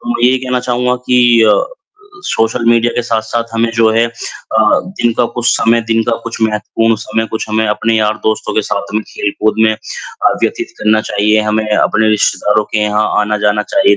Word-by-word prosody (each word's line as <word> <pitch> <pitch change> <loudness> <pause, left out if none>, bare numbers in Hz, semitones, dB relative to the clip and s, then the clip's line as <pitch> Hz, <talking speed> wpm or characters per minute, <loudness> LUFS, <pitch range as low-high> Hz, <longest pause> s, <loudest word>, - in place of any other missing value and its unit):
तो 260 - -9
मैं 235 - -2
ये 130 - +2
कहना 125 -1 -2
चाहूँगा 125 0 0
कि 120 -2 +4
अ, 105 -1 +5 0.8
सोशल 115 +2 0
मीडिया 120 0 +3
के 120 - -1
साथ-साथ 115 0 -2
हमें 115 0 +1
जो 115 -1 +3
है 115 +1 +3
अ, - - -8 0.5
दिन 120 - +1
का 120 - +4
कुछ 120 -1 -1
समय 115 +1 +2
दिन 115 0 +2
का 120 - -1
कुछ 115 -1 -6
महत्वपूर्ण 110 +1 0
समय 115 0 -2
कुछ 110 - -3
हमें 110 0 +1
अपने 110 +2 0
यार-दोस्तों 110 0 -1
के 110 - +1
साथ 100 +1 -4
में 110 - 0
खेल-कूद 105 +1 -1
में 110 - +3
अ, 110 - -3
व्यतीत - - -1
करना 110 0 +2
चाहिए। 105 +1 +2
हमें 110 0 -1
अपने 110 0 +2
रिश्तेदारों 105 0 +1
के 110 - +1
यहाँ 105 0 +1 0.2
आना-जाना 105 0 0
चाहिए 395 +7 +4
110 Hz, 190 wpm, -13 LUFS, 110-120 Hz, 0.8 s, अ